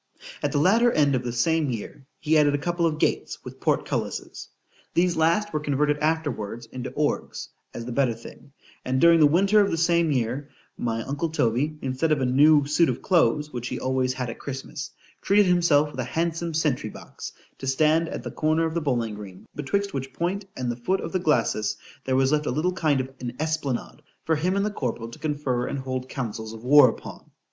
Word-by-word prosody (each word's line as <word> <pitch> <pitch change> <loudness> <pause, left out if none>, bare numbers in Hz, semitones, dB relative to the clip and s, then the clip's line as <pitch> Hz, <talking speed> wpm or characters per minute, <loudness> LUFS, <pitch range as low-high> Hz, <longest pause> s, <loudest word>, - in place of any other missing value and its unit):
At - - 0
the 150 - 0
latter 225 +10 +4
end 145 -6 +3
of 130 - +1
the 125 -1 -3
same 150 +5 +1
year 125 +3 -6
he 155 +1 +1
added 145 -2 +4
a - - +1
couple 170 +3 0
of 155 -2 -2
gates - - 0
with - - -9
port - - +1
cullises:——These 175 0 -3
last 170 +6 +2
were 155 - +1
converted 145 0 0
afterwards 145 -8 -2
into 125 +2 -6
orgues, 150 -1 -2 0.2
as 115 - -7
the 125 - -5
better 125 -2 +1
thing; 125 +4 -13 0.3
and 130 +1 0
during 170 +1 +6
the 150 - +7
winter 195 +7 +4
of 200 - +2
the 165 - -1
same 170 -1 +2
year, 130 +2 -1 0.3
my 115 -1 -2
uncle 145 +6 -2
Toby, 145 +1 0
instead 130 +5 0
of 150 - +3
a 130 - +1
new 145 +3 +5
suit 155 +3 +3
of - - -3
clothes, 150 -4 +2
which 120 -1 -4
he - - -4
always 130 0 0
had 125 -2 -3
at - - -11
Christmas, 140 +2 -6 0.3
treated 205 +1 +4
himself 170 -5 +3
with 130 - -9
a - - 0
handsome 165 0 -1
sentry 145 -8 0
box, - - -9 0.3
to 135 - -6
stand 155 +4 +2
at - - -5
the - - -5
corner 155 +1 +1
of 160 - -2
the 170 - -1
bowling 120 -7 -1
green, 100 -3 -10
betwixt 200 +8 -2
which 135 -1 -4
point 190 +4 -2
and 125 -2 -1
the - - -4
foot 185 +11 0
of 165 - -5
the 185 - 0
glacis, 115 - +1 0.3
there 130 - +1
was 135 +1 +3
left 150 0 +1
a - - +1
little 175 +4 0
kind 155 -7 +1
of 130 - -6
an 125 -1 -5
esplanade 155 -4 -2 0.2
for 160 - +2
him 180 +5 0
and 200 +1 +1
the 210 - -1
corporal 120 - -3
to 115 - -12
confer 145 -5 -1
and - - -3
hold 130 -1 -4
councils 110 -3 -5
of 110 0 -10
war 135 0 +7
upon. - - -9
145 Hz, 215 wpm, -25 LUFS, 130-165 Hz, 0.3 s, the